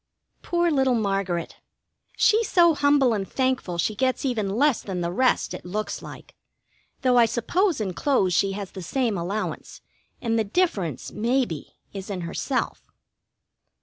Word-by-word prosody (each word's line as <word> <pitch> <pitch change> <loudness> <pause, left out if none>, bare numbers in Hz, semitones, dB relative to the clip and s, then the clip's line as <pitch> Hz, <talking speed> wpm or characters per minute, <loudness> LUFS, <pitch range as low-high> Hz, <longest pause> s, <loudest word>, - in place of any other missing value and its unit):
Poor 345 -1 +1
little 265 -3 +3
Margaret! 195 -5 -1 0.6
She's 440 0 +3
so 340 -2 +5
humble 285 -4 +3
and 195 -3 -3
thankful 255 -9 -1
she 195 +6 0
gets 260 +5 0
even 225 -6 0
less 255 +5 +2
than 185 -3 -4
the 170 0 -1
rest, 255 +7 +1
it - - -7
looks 210 +4 -4
like, - - -11 0.7
though 250 -1 +4
I 230 - +6
suppose 330 - 0
in 195 -4 -2
clothes 195 -7 +1
she 195 +2 +2
has 200 -1 -6
the 190 - -8
same 235 +4 -1
allowance, 195 +5 -4 0.4
and 230 -2 0
the - - +2
difference, 200 - -1
maybe, 230 - -1 0.2
is 195 0 -7
in 190 -3 -3
herself. 175 +10 -2
225 Hz, 150 wpm, -25 LUFS, 195-270 Hz, 0.7 s, I